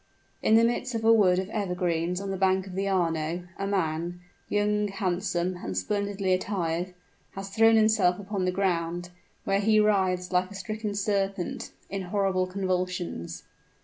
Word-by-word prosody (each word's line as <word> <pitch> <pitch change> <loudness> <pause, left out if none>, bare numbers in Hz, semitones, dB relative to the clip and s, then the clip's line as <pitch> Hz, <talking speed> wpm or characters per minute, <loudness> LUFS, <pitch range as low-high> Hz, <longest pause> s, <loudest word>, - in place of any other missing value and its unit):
In 220 - +4
the 225 - +6
midst 240 +1 0
of 225 -1 -2
a 225 - +7
wood 190 -5 +5
of 190 0 -1
evergreens 180 -3 -1
on 200 0 -4
the - - -1
banks 190 0 +2
of 190 - -8
the 195 +1 -1
Arno, 170 -2 0 0.2
a 195 - -1
man 175 -2 -1 0.3
young, 210 0 +1
handsome, 185 -2 -1
and 95 - -5
splendidly 200 - 0
attired 180 -2 -1 0.4
has 195 0 -6
thrown 225 +2 +5
himself 215 -5 +4
upon 195 -1 -3
the 185 - +1
ground, 175 -2 -1 0.3
where 195 0 +1
he 215 +1 +4
writhes 190 -4 +2
like 180 0 +2
a 200 - -10
stricken 215 +1 -4
serpent, 195 -2 -1 0.2
in 195 0 -4
horrible 185 0 0
convulsions. 185 - -3
190 Hz, 160 wpm, -27 LUFS, 180-205 Hz, 0.4 s, a